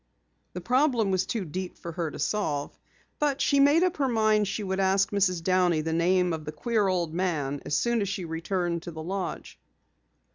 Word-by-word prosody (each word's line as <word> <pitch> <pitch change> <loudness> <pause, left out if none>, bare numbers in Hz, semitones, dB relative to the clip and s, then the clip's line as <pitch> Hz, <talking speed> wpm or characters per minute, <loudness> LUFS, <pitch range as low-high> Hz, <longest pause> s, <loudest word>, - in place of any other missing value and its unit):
The 180 - -5
problem 245 - +2
was 185 -1 0
too 220 -5 -2
deep 180 +4 -5
for 170 - -7
her 165 -1 -3
to - - -9
solve. 155 -4 -2 0.4
But 285 -2 +1
she 280 - +2
made 290 +5 +5
up 365 -2 0
her 275 -2 +1
mind 215 -3 +2
she 210 +2 -3
would 190 0 -2
ask 195 +2 +2
Mrs. 185 -4 +1
Downey 180 -3 +2
the 160 +1 -2
name 180 +1 +2
of 160 -1 -4
the 150 - -5
queer 210 +6 0
old 175 -4 -1
man 155 -6 -1
as 145 - +1
soon 235 -1 +1
as 200 - -1
she 190 -3 -3
returned 170 +1 -2
to 175 - -7
the 160 -1 -7
lodge. 185 +1 -5
185 Hz, 205 wpm, -27 LUFS, 170-215 Hz, 0.4 s, made